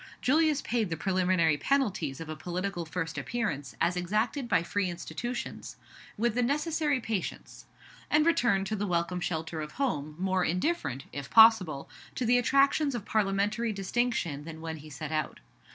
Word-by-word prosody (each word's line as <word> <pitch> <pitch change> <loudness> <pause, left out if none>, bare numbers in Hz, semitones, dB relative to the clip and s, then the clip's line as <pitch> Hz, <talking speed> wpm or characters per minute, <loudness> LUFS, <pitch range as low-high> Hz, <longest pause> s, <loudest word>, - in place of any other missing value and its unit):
Julius 305 +1 +2
paid 225 -4 0
the 165 - -2
preliminary 185 -4 +2
penalties 185 - 0
of 165 - -6
a 155 - -5
political 175 +1 -4
first 165 -1 -3
appearance, 150 - -3
as 175 +2 +2
exacted 215 +9 -1
by 170 - +3
free 195 +1 -1
institutions, 240 +8 -5 0.4
with 235 +1 +1
the 245 - +1
necessary 295 +2 +1
patience; 220 -5 -5 0.4
and 300 +1 +4
returned 240 -13 +3
to 215 - -2
the 205 0 -2
welcome 170 0 0
shelter 160 -2 -3
of 150 0 -7
home, 155 - -2
more 185 0 +1
indifferent, 165 - -1
if 140 -1 -6
possible, 220 -11 +6 0.3
to 250 - -1
the 245 +2 +4
attractions 275 +2 +3
of 220 -4 -5
Parliamentary 210 +2 +1
distinction 195 -7 -1
than 160 0 -8
when 160 0 -5
he 155 +1 -12
set 155 +1 -6
out. 155 -1 -2
195 Hz, 160 wpm, -29 LUFS, 165-240 Hz, 0.4 s, possible